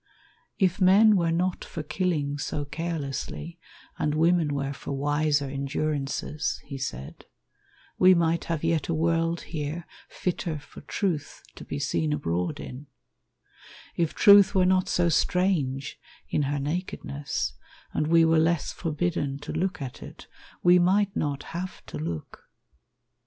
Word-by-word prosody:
"If 185 Hz, -1 st, +1 dB
men 205 Hz, +4 st, +7 dB
were 170 Hz, -3 st, +2 dB
not 180 Hz, +2 st, 0 dB
for 155 Hz, -, -6 dB
killing 150 Hz, -4 st, -1 dB
so 145 Hz, 0 st, -3 dB
carelessly, 160 Hz, +1 st, -4 dB, 0.4 s
And 150 Hz, 0 st, 0 dB
women 165 Hz, -1 st, +3 dB
were 140 Hz, 0 st, -2 dB
for 140 Hz, -, -6 dB
wiser 145 Hz, +1 st, +1 dB
endurances," 140 Hz, +2 st, -2 dB
He 140 Hz, -1 st, -7 dB
said, 65 Hz, -, -6 dB, 0.7 s
"we 185 Hz, 0 st, +7 dB
might 170 Hz, 0 st, +1 dB
have 165 Hz, -2 st, -2 dB
yet 165 Hz, -3 st, +1 dB
a 165 Hz, -, +1 dB
world 165 Hz, +1 st, +1 dB
here 155 Hz, +2 st, -5 dB, 0.2 s
Fitter 175 Hz, -3 st, -2 dB
for 145 Hz, -, -12 dB
Truth 165 Hz, -8 st, -3 dB
to -, -, -10 dB
be -, -, -5 dB
seen 150 Hz, +2 st, 0 dB
abroad 90 Hz, -, -2 dB
in; 135 Hz, +3 st, -8 dB, 1.1 s
"If 165 Hz, -2 st, 0 dB
Truth 200 Hz, 0 st, +7 dB
were 185 Hz, -1 st, +4 dB
not 185 Hz, 0 st, +2 dB
so 175 Hz, -1 st, +2 dB
strange 160 Hz, -6 st, +1 dB, 0.3 s
in -, -, 0 dB
her 145 Hz, -, 0 dB
nakedness, 145 Hz, -2 st, -3 dB, 0.4 s
And 155 Hz, -, 0 dB
we 165 Hz, 0 st, +5 dB
were 160 Hz, 0 st, +4 dB
less 165 Hz, -1 st, +1 dB
forbidden 155 Hz, -3 st, -2 dB
to 150 Hz, -, -6 dB
look 180 Hz, -4 st, -2 dB
at 130 Hz, -, -8 dB
it, -, -, -11 dB, 0.4 s
We 180 Hz, 0 st, +7 dB
might 195 Hz, +3 st, +2 dB
not 145 Hz, -1 st, -1 dB
have 180 Hz, +2 st, -5 dB
to 75 Hz, -, -7 dB
look." 80 Hz, 0 st, -6 dB
160 Hz, 140 wpm, -27 LUFS, 145-175 Hz, 1.1 s, men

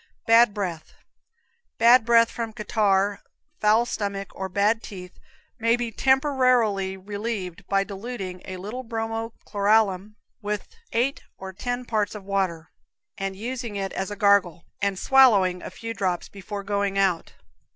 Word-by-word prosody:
Bad 230 Hz, 0 st, +6 dB
Breath. 180 Hz, -6 st, -5 dB, 0.8 s
Bad 235 Hz, +1 st, +6 dB
breath 230 Hz, -1 st, +5 dB
from 230 Hz, -2 st, -5 dB
catarrh, 205 Hz, -3 st, +1 dB, 0.4 s
foul 215 Hz, +3 st, +4 dB
stomach 200 Hz, -4 st, -4 dB
or 190 Hz, 0 st, -5 dB
bad 205 Hz, +4 st, +2 dB
teeth 180 Hz, -5 st, -10 dB, 0.4 s
may 230 Hz, +1 st, +3 dB
be 240 Hz, -1 st, -3 dB
temporarily 255 Hz, -7 st, +2 dB
relieved 200 Hz, -2 st, -5 dB
by 195 Hz, 0 st, +2 dB
diluting 195 Hz, -2 st, -6 dB
a 185 Hz, -, -6 dB
little 210 Hz, +7 st, -6 dB
bromo 225 Hz, -1 st, -4 dB
chloralum 205 Hz, -1 st, +1 dB, 0.3 s
with 210 Hz, -1 st, -4 dB, 0.2 s
eight 255 Hz, +4 st, 0 dB, 0.2 s
or 190 Hz, 0 st, -8 dB
ten 245 Hz, +5 st, -4 dB
parts 215 Hz, -3 st, -1 dB
of 210 Hz, -, -8 dB
water, 185 Hz, -4 st, -2 dB, 0.5 s
and 195 Hz, 0 st, -3 dB
using 235 Hz, +1 st, -5 dB
it 195 Hz, -1 st, -3 dB
as 190 Hz, -, -3 dB
a 205 Hz, -, -5 dB
gargle, 200 Hz, -5 st, +3 dB, 0.2 s
and 200 Hz, -1 st, 0 dB
swallowing 200 Hz, -9 st, +4 dB
a -, -, -7 dB
few 230 Hz, +5 st, -6 dB
drops 185 Hz, -5 st, -2 dB
before 200 Hz, +1 st, -7 dB
going 200 Hz, -1 st, -1 dB
out. 190 Hz, -4 st, +1 dB
205 Hz, 140 wpm, -25 LUFS, 195-230 Hz, 0.8 s, Bad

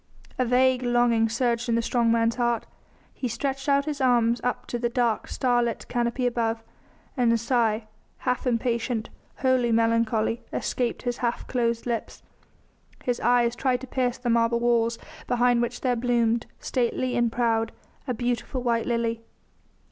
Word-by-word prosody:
A 255 Hz, -, +3 dB
vague 255 Hz, +1 st, +3 dB
longing 240 Hz, -2 st, +2 dB
surged 240 Hz, 0 st, 0 dB
in 230 Hz, -, +2 dB
the 230 Hz, -, +2 dB
strong 235 Hz, -1 st, +2 dB
man's 230 Hz, 0 st, +2 dB
heart; 240 Hz, -2 st, 0 dB, 0.5 s
he 255 Hz, -, -3 dB
stretched 270 Hz, +4 st, -3 dB
out 280 Hz, 0 st, +3 dB
his 295 Hz, -3 st, -3 dB
arms 240 Hz, -2 st, +3 dB
up 245 Hz, -, -2 dB
to 240 Hz, -, -4 dB
the 240 Hz, 0 st, 0 dB
dark, 235 Hz, -2 st, 0 dB
starlit 240 Hz, -3 st, 0 dB
canopy 240 Hz, +1 st, 0 dB
above, 230 Hz, -2 st, 0 dB, 0.5 s
and 245 Hz, -4 st, +3 dB
a 230 Hz, -, +3 dB
sigh, 230 Hz, -2 st, +1 dB, 0.3 s
half 250 Hz, 0 st, -1 dB
impatient, 235 Hz, -1 st, -1 dB, 0.3 s
wholly 255 Hz, -2 st, +2 dB
melancholy, 230 Hz, 0 st, +1 dB
escaped 245 Hz, -2 st, -2 dB
his 245 Hz, -1 st, -2 dB
half 240 Hz, -1 st, -2 dB
closed 235 Hz, -2 st, -1 dB
lips. 235 Hz, -2 st, -4 dB, 0.8 s
His 245 Hz, -1 st, -1 dB
eyes 240 Hz, -1 st, +3 dB
tried 250 Hz, -1 st, 0 dB
to -, -, -6 dB
pierce 255 Hz, -1 st, -1 dB
the 245 Hz, -1 st, -1 dB
marble 235 Hz, 0 st, +2 dB
walls 235 Hz, -1 st, +2 dB, 0.3 s
behind 245 Hz, -1 st, +3 dB
which 240 Hz, 0 st, -3 dB
there 250 Hz, -2 st, +1 dB
bloomed 235 Hz, -1 st, +1 dB
stately 250 Hz, 0 st, -1 dB
and 235 Hz, -1 st, +2 dB
proud 225 Hz, -2 st, +1 dB, 0.4 s
a 250 Hz, -, -1 dB
beautiful 245 Hz, +1 st, -2 dB
white 235 Hz, -2 st, 0 dB
lily. 230 Hz, -1 st, -1 dB
240 Hz, 155 wpm, -25 LUFS, 230-250 Hz, 0.8 s, A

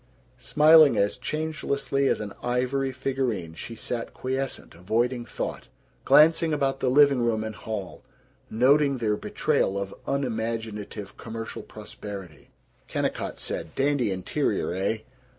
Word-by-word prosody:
Smiling 155 Hz, +3 st, +6 dB
as 100 Hz, +1 st, +2 dB
changelessly 140 Hz, 0 st, -1 dB
as -, -, +1 dB
an 105 Hz, -2 st, -5 dB
ivory 130 Hz, +2 st, 0 dB
figurine 130 Hz, -10 st, -2 dB
she 115 Hz, +7 st, -7 dB
sat 115 Hz, +1 st, -5 dB
quiescent, 130 Hz, +1 st, -3 dB
avoiding 120 Hz, +8 st, -1 dB
thought, -, -, -5 dB, 0.4 s
glancing 160 Hz, +1 st, +5 dB
about 135 Hz, -2 st, 0 dB
the 130 Hz, -, +1 dB
living 140 Hz, -1 st, +5 dB
room 115 Hz, -2 st, +1 dB
and 110 Hz, 0 st, -4 dB
hall, 105 Hz, -3 st, -6 dB, 0.5 s
noting 140 Hz, +4 st, +4 dB
their 110 Hz, -3 st, +1 dB
betrayal 100 Hz, -1 st, 0 dB
of 100 Hz, 0 st, -4 dB
unimaginative 110 Hz, -5 st, -3 dB
commercial 115 Hz, 0 st, -6 dB
prosperity. 95 Hz, -7 st, -10 dB, 0.4 s
Kennicott -, -, -2 dB
said, -, -, -5 dB
"Dandy 135 Hz, -4 st, +1 dB
interior, 95 Hz, -2 st, -1 dB
eh? 95 Hz, +4 st, 0 dB
120 Hz, 120 wpm, -26 LUFS, 105-135 Hz, 0.5 s, Smiling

